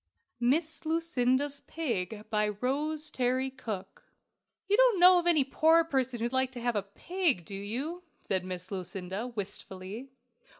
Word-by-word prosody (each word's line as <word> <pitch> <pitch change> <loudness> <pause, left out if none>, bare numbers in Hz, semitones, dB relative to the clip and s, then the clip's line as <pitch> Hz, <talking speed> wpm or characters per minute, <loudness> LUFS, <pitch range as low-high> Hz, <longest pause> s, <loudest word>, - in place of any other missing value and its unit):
MISS 310 +8 +1
LUCINDA'S 285 -4 +1
PIG. 220 - -3
BY 210 -1 +2
ROSE 300 +5 -1
TERRY 255 0 0
COOKE. 210 -7 -6 0.6
"You 405 - +4
don't - - +5
know 360 0 +8
of 350 - -2
any 320 -5 +5
poor 320 +5 +4
person 260 -6 -1
who'd 235 +2 -2
like 260 0 +2
to 245 - -6
have 240 -1 0
a 205 - +2
pig, 265 - -1
do 200 - -8
you?" 250 - -4 0.2
said 190 -1 0
Miss 185 0 -6
Lucinda, 190 +3 -4
wistfully. 205 +1 -6
255 Hz, 145 wpm, -30 LUFS, 205-315 Hz, 0.6 s, know